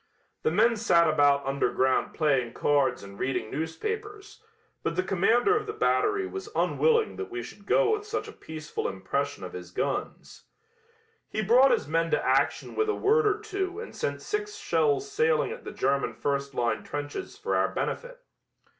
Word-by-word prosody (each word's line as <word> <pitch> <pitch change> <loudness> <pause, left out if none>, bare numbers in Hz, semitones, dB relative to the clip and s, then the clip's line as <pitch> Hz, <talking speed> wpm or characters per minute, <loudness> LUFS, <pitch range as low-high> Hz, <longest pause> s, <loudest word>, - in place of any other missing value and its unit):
The - - +2
men 220 +7 +3
sat 170 -7 +4
about 145 -2 +3
underground 135 -1 +1
playing 135 -7 +1
cards 145 -6 +1
and 100 0 -11
reading 130 -4 -2
newspapers, 415 - -5 0.4
but 165 - -2
the 185 - +1
commander 225 - +3
of 425 0 -1
the 425 - -3
battery 420 -2 +1
was 390 +2 -6
unwilling 460 -2 +2
that 395 - -5
we 365 -1 -5
should 200 -1 -12
go 430 - +4
with 425 -1 0
such - - -3
a - - -8
peaceful 155 -1 -5
impression 140 +8 -3
of 90 - -7
his 90 -1 -8
guns. 90 - -4 0.8
He 215 - -2
brought 250 +6 +6
his - - +1
men 165 +2 +1
to - - 0
action - - +1
with 435 0 0
a 430 - +1
word 435 +2 +3
or 415 0 +2
two 395 -2 -3
and 460 - -8
sent - - -3
six 420 0 -3
shells 415 -3 +1
sailing 465 +2 +2
at 480 +1 -8
the - - -5
German 135 -3 0
first 140 +2 -2
line 120 -1 0
trenches 145 - -5
for 445 +2 -2
our - - +3
benefit. - - -4
220 Hz, 175 wpm, -27 LUFS, -, 0.8 s, brought